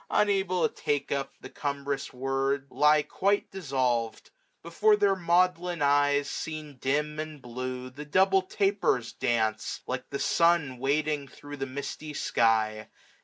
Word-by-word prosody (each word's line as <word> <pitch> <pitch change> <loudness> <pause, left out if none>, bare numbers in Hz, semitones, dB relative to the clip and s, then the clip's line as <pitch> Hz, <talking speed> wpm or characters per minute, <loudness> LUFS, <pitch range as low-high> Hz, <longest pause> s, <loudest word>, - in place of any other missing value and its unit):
Unable 195 -3 +2
to - - -16
take 145 -1 -2
up 140 -1 -2
the - - -9
cumbrous 140 -1 -3
word. 135 +1 -1
Lie 150 0 +4
quite 200 +5 0
dissolved. 130 - -1 0.3
Before 210 +6 +3
their 200 -2 +3
maudlin 175 -2 +1
eyes. 145 0 +3
Seen 155 -3 -6
dim, 150 +4 -1
and 155 -1 -5
blue, 125 +1 -6
the 145 +3 -8
double 190 +6 +3
tapers 195 - 0
dance, 110 -4 0
SSS - - -5
Like - - -4
the - - -3
sun 165 -7 +2
wading 145 +1 0
thro* 145 +2 -10
the 135 -1 -4
misty 140 +3 -6
sky. 110 -3 +1
145 Hz, 140 wpm, -28 LUFS, 130-170 Hz, 0.3 s, Lie